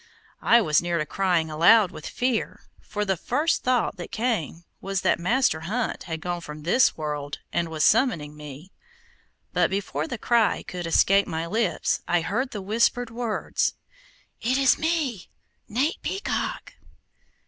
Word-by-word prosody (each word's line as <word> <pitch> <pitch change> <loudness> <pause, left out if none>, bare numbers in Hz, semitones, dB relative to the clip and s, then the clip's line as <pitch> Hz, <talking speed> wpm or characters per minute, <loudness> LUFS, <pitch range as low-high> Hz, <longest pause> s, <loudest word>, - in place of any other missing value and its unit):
I 235 0 +5
was 155 -4 +3
near 175 0 -1
to 155 - -1
crying 175 -1 0
aloud 180 +5 +5
with - - -8
fear, 245 -3 -1 0.2
for 210 0 -3
the 190 -1 +1
first 305 - 0
thought 250 -5 +1
that 175 - -8
came 215 - -2 0.2
was 195 -1 -2
that - - +2
Master 225 -1 +2
Hunt 215 +9 -3
had 160 -3 -5
gone 175 0 -3
from 150 -2 -9
this 210 +10 +3
world, 150 -2 -4 0.2
and 170 -1 0
was 155 -1 -1
summoning 180 - +2
me; 150 +4 -10 0.8
but - - +3
before 170 -6 -2
the 240 - -4
cry 230 0 +2
could 175 -2 -6
escape 195 +4 +4
my 165 -1 -3
lips, 200 -2 0
I 175 0 +2
heard 225 +11 -1
the 205 -5 -6
whispered 230 +3 +1
words: 230 -2 -1 0.7
"It 250 +4 +1
is 270 -1 +4
me, 310 - -1 0.4
Nate 265 +9 0
Peacock!" 405 +5 -3
195 Hz, 155 wpm, -25 LUFS, 165-235 Hz, 0.8 s, I